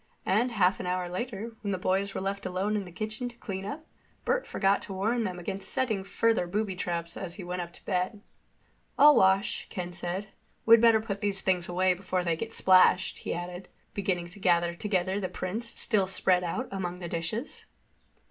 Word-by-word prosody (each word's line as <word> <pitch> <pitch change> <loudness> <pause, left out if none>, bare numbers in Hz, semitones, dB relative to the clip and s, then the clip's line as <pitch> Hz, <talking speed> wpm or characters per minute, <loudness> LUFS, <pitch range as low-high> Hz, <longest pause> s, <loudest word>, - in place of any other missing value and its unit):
And 230 +6 +2
half 190 -3 +3
an 180 - -4
hour 180 0 -1
later, 225 +4 -5
when 205 - -3
the 190 - 0
boys 195 +2 0
were - - -2
left 195 0 -3
alone 190 +3 -1
in 205 -2 -1
the 180 - -10
kitchen 215 +6 -4
to 240 - -15
clean 195 -4 -5
up, 310 +9 -6 0.4
Bert - - +1
forgot 195 0 +2
to 195 - -6
warn 220 +5 0
them 180 -2 -3
against 190 +2 -5
setting 235 -7 -1
further 225 -1 +1
booby 200 +1 -1
traps 170 -2 -3
as 175 -3 -5
he 195 - -7
went 180 +1 -3
up 170 0 -6
to - - -11
bed. 185 +3 -1 0.8
"I'll 295 +1 +8
wash," 190 +1 +3
Ken 180 -1 -5
said. 185 +3 -3 0.4
"We'd 230 0 +8
better 230 -2 +6
put 205 -3 -4
these 200 -2 0
things 180 -2 0
away 185 +1 +3
before 185 0 -2
they 170 -2 +1
get 225 +7 -5
splashed," 185 -2 +4
he - - -3
added, 175 +1 -6 0.3
beginning 180 -3 -1
to 200 +4 -14
gather 175 -2 +3
together 190 +1 -1
the 185 -2 -3
prints 225 +6 -5
still 200 -4 +3
spread 185 -1 +2
out 235 +9 -2
among 180 -2 -3
the 175 -1 -6
dishes. 170 - -4
190 Hz, 200 wpm, -29 LUFS, 180-215 Hz, 0.8 s, I'll